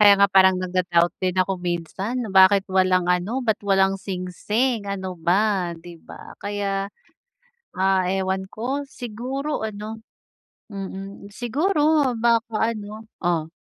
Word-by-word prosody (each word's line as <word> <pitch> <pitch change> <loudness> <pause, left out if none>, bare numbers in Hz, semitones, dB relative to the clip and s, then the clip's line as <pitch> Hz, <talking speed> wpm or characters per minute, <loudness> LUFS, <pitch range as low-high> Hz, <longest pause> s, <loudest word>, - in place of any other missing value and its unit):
Kaya 205 -1 +8
nga 200 - +6
parang 190 -1 +6
nagda-doubt 180 -2 +1
din 185 -1 -1
ako 185 0 0
minsan, 180 +6 -3 0.2
bakit 190 +1 +6
walang 185 -1 +3
ano, 220 +9 -2
ba't 220 -2 0
walang 195 0 +3
singsing 200 +5 -2
ano 190 -2 -4
ba, 185 0 +1
di 170 0 -12
ba? - - -12
Kaya, 200 -1 -2 0.9
ah, 190 0 +2
ewan 190 0 -1
ko 255 +7 -3
siguro 255 +6 -4
ano, 215 +1 -6 0.7
mm, 195 +1 -7
siguro 295 - +1
baka 230 -1 +1
ano 215 +1 -8 0.2
oh. 165 -2 0
195 Hz, 125 wpm, -23 LUFS, 185-225 Hz, 0.9 s, Kaya